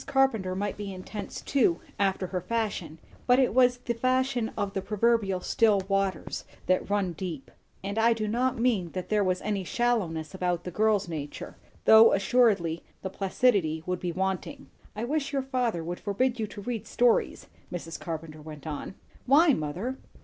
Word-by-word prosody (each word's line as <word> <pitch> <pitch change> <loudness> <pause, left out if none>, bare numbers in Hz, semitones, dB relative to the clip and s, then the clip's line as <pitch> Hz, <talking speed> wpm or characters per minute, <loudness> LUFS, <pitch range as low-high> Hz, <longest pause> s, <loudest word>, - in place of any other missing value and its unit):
Carpenter 265 -9 +2
might 200 +1 -2
be 205 -1 -5
intense 190 +3 -7
too, 225 -12 +2 0.2
after 195 -1 +1
her 180 0 -3
fashion; 205 -6 -3 0.3
but 250 0 +6
it 260 -2 +3
was 250 -1 +4
the 245 -1 -3
fashion 255 -1 +1
of 200 -1 -2
the 195 - -1
proverbial 210 -2 +1
still 220 -3 +3
waters 195 -1 -1 0.2
that 185 +1 +1
run 200 -3 0
deep. 165 -4 -6 0.3
And 200 +3 -2
I 230 +1 +5
do 215 -2 -3
not 250 +4 0
mean 225 -8 +1
that 185 -1 -5
there 210 -1 +2
was 185 -1 0
any 205 -2 -1
shallowness 185 -8 -1
about 180 -2 -1
the 180 - -5
girl's 210 +1 +2
nature; 150 -4 -6 0.3
though 220 +1 +8
assuredly 195 -6 +2 0.2
the 190 - -4
placidity 190 -6 +1
would 180 -1 -2
be 180 - -2
wanting. 190 +10 -3 0.2
"I 215 - -3
wish 285 +3 -1
your 275 -2 0
father 245 -9 -1
would 175 +2 -5
forbid 240 +5 0
you 215 - -1
to 205 - -9
read 230 +1 -4
stories," 240 -1 +2 0.3
Mrs. 165 -2 -6
Carpenter 160 -2 -6
went 150 -1 -10
on. 155 +4 -5 0.3
"Why, 305 +6 +6
mother?" 185 - -3
200 Hz, 170 wpm, -28 LUFS, 180-240 Hz, 0.3 s, though